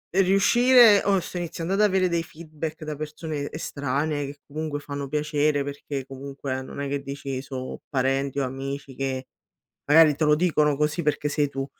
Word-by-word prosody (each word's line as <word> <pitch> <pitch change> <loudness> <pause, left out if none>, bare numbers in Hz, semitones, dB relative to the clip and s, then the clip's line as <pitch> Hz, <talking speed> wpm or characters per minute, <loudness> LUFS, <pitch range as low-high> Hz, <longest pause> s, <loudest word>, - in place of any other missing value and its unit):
riuscire 210 +4 +6
oh 195 -2 +3
sto 180 - -6
iniziando 175 +1 -3
ad 205 - +2
avere 190 -3 +3
dei 170 -1 +1
feedback 155 -1 -7
da 155 -1 -4
persone 150 -1 -5
estranee 145 0 -2
che 145 +1 -9
comunque 150 0 -4
fanno 140 -1 -5
piacere 150 0 +1
perché 140 -1 -5
comunque 135 0 -5
non 135 - -9
è 140 - -2
che 140 0 -2
dici: 140 -1 -5
"So' 130 -2 -6
parenti 135 0 0
o - - +1
amici 135 +1 -6
che 130 -1 -3 0.6
magari 150 0 +6
te 155 - -1
lo 150 0 +5
dicono 150 -4 +2
così 150 +3 0
perché 150 0 0
sei 145 0 +1
tu." 135 0 -3
150 Hz, 175 wpm, -25 LUFS, 140-160 Hz, 0.6 s, riuscire